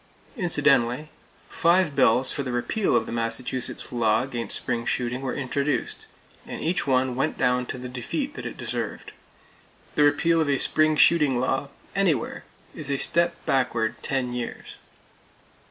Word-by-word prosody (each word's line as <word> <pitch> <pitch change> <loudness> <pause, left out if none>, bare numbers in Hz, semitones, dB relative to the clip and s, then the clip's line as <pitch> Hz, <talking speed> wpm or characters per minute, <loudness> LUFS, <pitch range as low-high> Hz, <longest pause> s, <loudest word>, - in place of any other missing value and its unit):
Incidentally, 150 - +2 0.4
five 170 -3 +2
bills 130 -1 +4
for 145 - -2
the 130 -2 -4
repeal 120 - 0
of - - +2
the - - -7
Massachusetts 115 +2 -3
law 115 -1 +2
against 120 -5 -2
spring 120 -1 -2
shooting 125 +1 -2
were 135 -2 -3
introduced, 140 +1 -2 0.4
and - - -6
each 170 -1 -1
one 130 -1 +2
went 135 - -1
down 125 0 +1
to - - -5
the 125 0 -7
defeat 130 - -4
that - - -6
it - - -8
deserved. - - -4 0.8
The - - +1
repeal 165 +3 +3
of 150 - 0
a 140 - +3
spring 155 +3 +3
shooting 150 -4 +4
law, 135 +2 -1 0.3
anywhere, 180 - 0 0.3
is - - -7
a 140 - +1
step 170 +5 +3
backward 120 -4 0
ten 130 -3 -1
years! 120 -1 -6
130 Hz, 155 wpm, -25 LUFS, 125-150 Hz, 0.8 s, bills